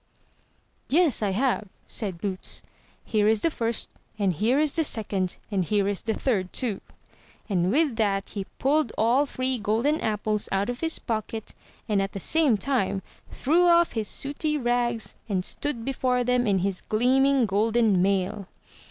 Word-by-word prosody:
"Yes, 315 -5 +4
I 205 - +1
have," 215 +1 0 0.2
said 195 -6 -3
Boots; 190 0 -2 0.4
"here 210 -1 +2
is 220 -1 +3
the 330 - +2
first, 230 -4 -2 0.3
and 195 -3 +1
here 230 - +2
is 300 -2 +1
the 330 - +1
second, 200 - -2
and 195 -2 +1
here 200 +2 +1
is 200 -1 -1
the 225 -2 -2
third 195 -8 -1
too;" 225 -7 -2 0.7
and 180 -3 +1
with 285 -3 +2
that 200 -3 0
he 200 -2 -4
pulled 280 -2 +1
all 245 +6 +3
three 255 -1 -2
golden 230 +9 +1
apples 215 -1 -1
out 195 +4 0
of 245 - -7
his 325 0 +1
pocket, 220 -1 -4 0.3
and 205 -2 +2
at 195 0 -3
the 195 - -4
same 290 - +3
time 195 -4 -1 0.3
threw 340 +6 +2
off 340 0 +5
his 220 -3 -2
sooty 300 +2 0
rags, 240 -3 0 0.2
and 185 -3 -1
stood 235 -6 -2
before 255 -2 0
them 250 0 +1
in 200 -2 +3
his 195 -2 -2
gleaming 260 +3 +3
golden 215 -1 +2
mail. 195 +1 0
225 Hz, 165 wpm, -26 LUFS, 200-265 Hz, 0.7 s, off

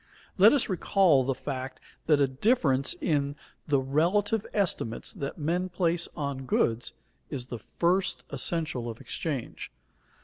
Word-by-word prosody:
_ - - -34 0.4
Let 205 +4 +9
us 285 -4 +3
recall 180 -6 +3
the 135 +1 -1
fact 130 -1 -5 0.3
that 150 -2 +5
a 140 - +4
difference 135 - +2
in 145 -3 0 0.3
the 145 -3 +3
relative 180 +11 +1
estimates 175 - -1
that 140 0 -5
men 175 +4 -1
place 175 -1 0
on 140 -4 -4
goods 115 -1 +1 0.4
is 125 -3 -4
the 120 - -4
first 180 - 0
essential 140 -3 -2
of 115 - -7
exchange. 140 -8 -5
150 Hz, 140 wpm, -28 LUFS, 135-180 Hz, 0.4 s, Let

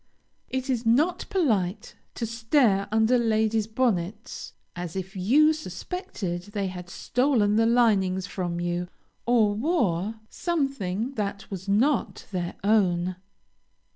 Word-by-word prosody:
It 260 0 -2
is 250 -3 0
not 275 +10 +2
polite 215 - 0 0.2
to 235 - -2
stare 225 -3 +2
under 220 +3 +3
ladies' 220 -1 +1
bonnets, 220 -5 -2 0.2
as 175 -1 -5
if 190 +1 -5
you 280 +12 +4
suspected 225 - -5
they 200 -3 -1
had 180 -1 -8
stolen 240 -2 +1
the 225 +1 +4
linings 200 -6 +3
from 175 -3 -3
you, 175 0 -2 0.4
or 225 -4 +4
wore 220 - 0
something 270 - -2
that 200 -1 -3
was 190 0 -6
not 245 +7 +1
their 175 -2 -3
own. 185 -4 +2
215 Hz, 120 wpm, -26 LUFS, 185-245 Hz, 0.4 s, you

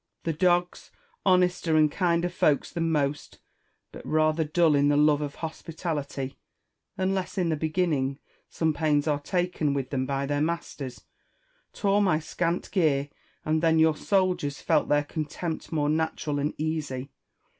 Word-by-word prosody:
The 165 - -1
dogs, 175 +2 +1 0.4
honester 180 -3 +3
and 155 -1 +4
kinder 175 -1 +1
folks 155 -4 +1
than 165 -1 -1
most, 145 -1 -1 0.5
but - - -10
rather 155 +1 +2
dull 160 +1 +3
in 145 0 +3
the 145 0 +3
love 150 0 +4
of 145 -1 -4
hospitality, 155 -5 -5 0.6
unless 190 +1 -1
in 180 -3 +1
the 160 - +1
beginning 155 -4 0 0.3
some 160 -1 0
pains 150 -1 +1
are 145 -2 +1
taken 170 -3 -1
with 135 -2 -3
them 130 -2 -1
by 140 0 -1
their 145 +1 -1
masters, 155 -5 -4 0.7
tore 200 0 +1
my 185 -6 +3
scant 170 +2 -2
gear; 145 -7 +2 0.4
and 155 +1 +1
then 165 -1 +3
your 160 -1 +4
soldiers 180 -7 0
felt - - +1
their 145 0 +3
contempt 160 +2 -5
more 150 -3 0
natural 155 -1 -1
and 145 +2 -1
easy. 145 -4 -3
155 Hz, 150 wpm, -27 LUFS, 145-170 Hz, 0.7 s, and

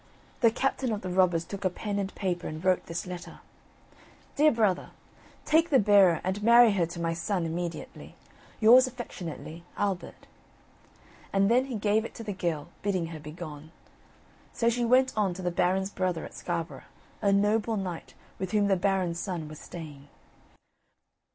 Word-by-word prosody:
The 230 - +5
captain 260 +1 -1
of 210 - -3
the 185 - -5
robbers 180 -2 +2
took 200 0 -7
a 185 - +2
pen 205 +3 -4
and 195 -1 -4
paper 180 -3 -2
and 155 +3 -7
wrote 185 -1 +2
this 165 +3 -4
letter: 180 -1 -8 1.0
"Dear 305 +1 +5
Brother, 215 -6 +1 0.6
Take 325 +2 +3
the 275 - +5
bearer 200 -6 +5
and 190 +3 -2
marry 235 +1 +7
her 180 -4 +1
to 170 +1 -8
my 165 0 0
son 170 +2 -2
immediately. 170 +1 -5 0.4
"Yours 245 +4 +7
affectionately, 175 -9 -7
"Albert." 195 -4 -3 1.1
And 195 +2 +3
then 250 +2 +4
he 265 -3 -5
gave 210 +1 +1
it 230 - -8
to 230 - -7
the 210 -2 -4
girl, 170 -5 -3
bidding 190 -4 0
her 155 - -7
begone. 150 0 -9 0.8
So 230 - +2
she 240 +1 0
went 255 +2 +4
on 200 -4 +1
to 185 - -7
the 175 - 0
Baron's 190 +3 +1
brother 180 -4 -2
at - - -11
Scarborough, 170 -1 -4 0.4
a 200 - +3
noble 210 +2 +2
knight, 180 -4 -5 0.2
with 190 +1 -4
whom 205 -1 +3
the 195 - +3
Baron's 180 -2 0
son 175 -6 -4
was 155 0 -10
staying. 150 -4 -10
190 Hz, 170 wpm, -28 LUFS, 170-215 Hz, 1.1 s, marry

